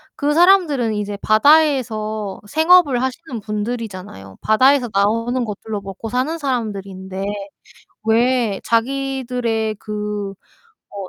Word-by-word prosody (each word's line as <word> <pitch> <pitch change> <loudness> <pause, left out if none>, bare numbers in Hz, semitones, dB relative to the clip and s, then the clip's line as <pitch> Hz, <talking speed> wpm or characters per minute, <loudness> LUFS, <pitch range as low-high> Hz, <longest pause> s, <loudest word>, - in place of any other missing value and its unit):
그 290 0 0
사람들은 325 - +4
이제 205 -1 -3
바다에서 220 -5 +2
생업을 315 - +4
하시는 260 -2 -4
분들이잖아요. 205 - -6
바다에서 255 +4 +4
나오는 230 +5 +1
것들로 210 -1 -5
먹고 195 +3 -7
사는 260 +8 -1
사람들인데 195 - -4 0.8
왜 230 -2 +2
자기들의 245 -3 -1
그 210 -2 -4 0.6
뭐 195 -2 -7
225 Hz, 265 characters per minute, -19 LUFS, 210-265 Hz, 0.8 s, 사람들은